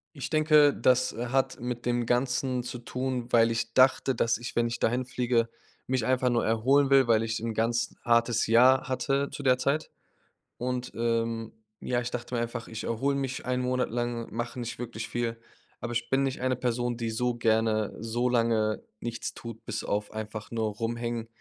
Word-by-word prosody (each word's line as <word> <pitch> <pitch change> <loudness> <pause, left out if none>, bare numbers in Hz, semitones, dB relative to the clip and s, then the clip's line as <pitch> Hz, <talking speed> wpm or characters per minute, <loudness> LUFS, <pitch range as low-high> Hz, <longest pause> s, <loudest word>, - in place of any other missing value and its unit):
Ich 140 - -5
denke, 155 -2 +5
das, 130 0 +3
äh, 120 +2 -4
hat 135 0 0
mit 120 -1 -4
dem 120 -1 0
Ganzen 125 +1 0
zu 125 0 -6
tun, 125 0 -3
weil 115 -1 +5
ich 115 0 -2
dachte, 130 0 +4
dass 115 -1 +1
ich, 120 0 -7
wenn 120 0 +3
ich 115 - -3
dahin 125 +3 +1
fliege, 120 -2 0 0.4
mich 130 -3 0
einfach 130 -1 +2
nur 120 - +1
erholen 135 +5 +3
will, 135 -2 +6
weil 115 -1 +4
ich 110 0 -2
'n 115 -1 -3
ganz 115 +1 0
hartes 115 -1 +3
Jahr 125 +4 +5
hatte 140 +2 0
zu 145 - -7
der 130 -1 +4
Zeit. 140 +4 0 0.7
Und, 125 0 -3
ähm, 115 -1 -1 0.3
ja, 120 -1 -1
ich 120 - -4
dachte 120 0 -4
mir 115 - 0
einfach: 120 0 -4
„Ich 110 -1 -6
erhole 135 +5 0
mich 135 -1 -3
1 125 0 0
Monat 125 0 0
lang, 120 0 -3
mache 120 +2 -4
nicht 115 -1 -5
wirklich 115 -2 -5
viel.“ 115 -1 -2 0.4
Aber 120 - -4
ich 115 0 -2
bin 135 +1 +2
nicht 135 -2 -2
eine 130 0 +1
Person, 120 0 -1
die 115 -2 -2
so 125 +2 0
gerne 110 -2 +1
so 115 +2 -1
lange 115 -3 +1 0.2
nichts 115 -1 -4
tut, 115 -1 -9
bis 110 -1 -4
auf 105 0 -2
einfach 110 0 -6
nur 110 -2 -1
rumhängen. 115 0 -3
120 Hz, 195 wpm, -28 LUFS, 115-125 Hz, 0.7 s, will